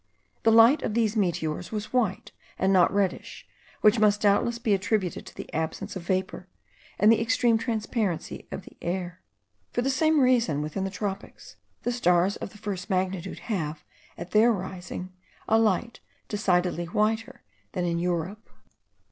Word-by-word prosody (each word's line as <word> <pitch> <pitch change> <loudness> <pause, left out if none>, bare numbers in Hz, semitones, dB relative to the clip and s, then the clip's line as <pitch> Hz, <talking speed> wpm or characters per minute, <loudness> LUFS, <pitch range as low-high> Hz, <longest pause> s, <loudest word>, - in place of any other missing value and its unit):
The 225 - +4
light 230 +6 +7
of 215 - -2
these 225 -2 +1
meteors 175 -4 -1
was 215 +1 -5
white, 220 -7 0 0.3
and 190 +1 +2
not 180 -2 +5
reddish, 195 -2 -2 0.3
which 215 +2 +5
must 210 -1 +3
doubtless 210 +3 +2
be 230 -3 +1
attributed 195 -2 -1
to - - -12
the - - -9
absence 160 +4 -3
of 185 - -4
vapour 185 +1 -2 0.5
and 210 +3 +6
the 225 - +3
extreme 230 -1 +2
transparency 220 -6 -2
of - - -5
the - - -14
air. 180 0 -4 0.5
For 245 - -1
the 270 - +1
same 310 +3 +3
reason, 235 - +3
within 155 +6 -3
the - - -2
tropics, 195 0 -6 0.3
the 245 - 0
stars 180 -4 +2
of - - -6
the 210 - -15
first 200 -3 -5
magnitude 185 -1 -2
have, 155 -5 -3 0.3
at 175 - -8
their 220 +3 +5
rising, 185 -2 -5 0.3
a 225 - +4
light 225 +2 +1 0.3
decidedly 180 -4 0
whiter 215 +5 -1 0.3
than 180 - -1
in 170 -1 0
Europe. 180 +4 -3
200 Hz, 160 wpm, -26 LUFS, 180-225 Hz, 0.5 s, light